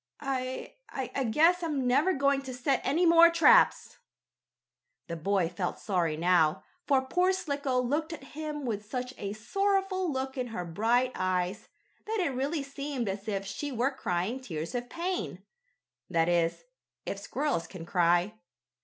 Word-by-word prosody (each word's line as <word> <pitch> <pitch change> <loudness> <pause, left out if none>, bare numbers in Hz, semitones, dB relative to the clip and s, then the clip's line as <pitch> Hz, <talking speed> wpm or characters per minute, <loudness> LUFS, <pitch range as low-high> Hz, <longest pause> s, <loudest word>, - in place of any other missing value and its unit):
I 260 -2 -4
I 265 0 -3
guess 325 +10 +4
I'm 295 -6 -1
never 280 +9 +3
going 280 -3 +2
to 260 -2 -7
set 260 +1 +1
any 320 +7 +2
more 335 0 +8
traps." 440 +9 +4 1.1
The 170 - -5
boy 185 +2 +1
felt 180 +1 -3
sorry 170 -6 -1
now, 170 -1 +3 0.2
for 270 -3 +3
poor 360 +8 +2
Slicko 285 -8 -1
looked 295 +6 -1
at 320 -4 -7
him 300 -2 -5
with 210 -3 -4
such 250 0 -4
a 200 0 -3
sorrowful 385 - 0
look 265 0 -3
in 250 - -1
her 220 -6 -5
bright 230 +9 +1
eyes, 185 +1 -1 0.4
that 440 0 -1
it 335 -8 0
really 280 +4 -1
seemed 275 -3 -4
as 195 +2 -4
if 195 -2 -2
she 245 +9 -4
were 255 +2 +1
crying 200 -1 -2
tears 165 -10 -5
of 245 0 -3
pain 355 +2 -3 0.7
that 165 -2 +2
is, 170 - +1 0.4
if 200 - -4
squirrels 260 - -2
can 175 -4 -9
cry. 175 +4 +2
255 Hz, 155 wpm, -29 LUFS, 195-295 Hz, 1.1 s, more